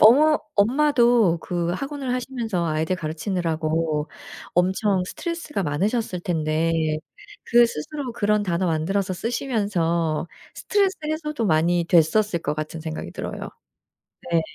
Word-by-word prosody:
어머 295 +8 +7 0.2
엄마도 240 - +4
그 175 0 -2
학원을 275 +5 -3
하시면서 235 -8 -2
아이들 160 +3 0
가르치느라고 160 -2 -1 0.5
엄청 190 +2 +2
스트레스가 335 - -4
많으셨을 185 +6 -1
텐데 160 -1 0 0.7
그 240 0 +6
스스로 245 - -4
그런 210 -1 +1
단어 180 -1 0
만들어서 185 +4 0
쓰시면서 180 - -1 0.3
스트레스 395 -2 +1
해소도 300 -6 -2
많이 170 +1 +2
됐었을 175 +3 +3
것 150 - -1
같은 155 +1 -5
생각이 160 - -5
들어요. - - -5 0.8
네. 165 - +4
185 Hz, 300 characters per minute, -23 LUFS, 165-240 Hz, 0.8 s, 어머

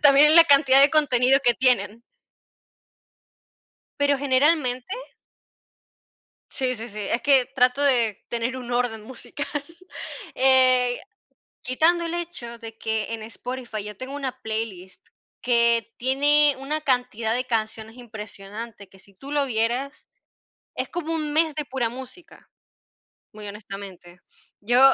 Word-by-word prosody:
También 285 0 +7
en 315 - +5
la 335 - +10
cantidad 275 -3 +5
de 280 - +8
contenido 270 -3 +3
que 240 -1 +4
tienen. 230 -4 +1 2.0
Pero, 285 -1 +2
generalmente 270 - +1 1.6
Sí, 255 -3 -1
sí, 225 +2 -7
sí, 210 - -10
es 210 +4 -1
que 270 -3 +4
trato 250 +1 +2
de 235 -7 +3
tener 235 +2 -3
un 245 -1 -8
orden 240 -3 -1
musical, 260 +5 -7 0.9
eh, 255 -1 +5 0.6
quitando 330 +7 +1
el 335 0 -4
hecho 325 -9 -6
de 225 -1 -10
que 220 0 -3
en 225 - -7
Spotify 235 -1 -7
yo 210 -1 -8
tengo 260 +5 -7
una 260 -3 -5
playlist 220 - -5 0.4
que 235 -1 +1
tiene 290 +3 +3
una 295 +3 -4
cantidad 250 -5 -1
de 250 +1 -1
canciones 225 -1 -4
impresionante, 215 -2 -9
que 195 - -20
si 200 +1 -17
tú 275 +9 -10
lo 290 -1 +1
vieras 245 +4 -1 0.7
es - - -3
como 330 -2 -4
un 305 -2 -3
mes 315 -1 +2
de 300 -1 -3
pura 255 -3 -2
música, 260 +7 -12 0.8
muy 210 -1 -9
honestamente. 195 -4 -11 0.4
Yo 240 +5 +2
250 Hz, 130 wpm, -23 LUFS, 225-280 Hz, 2.0 s, la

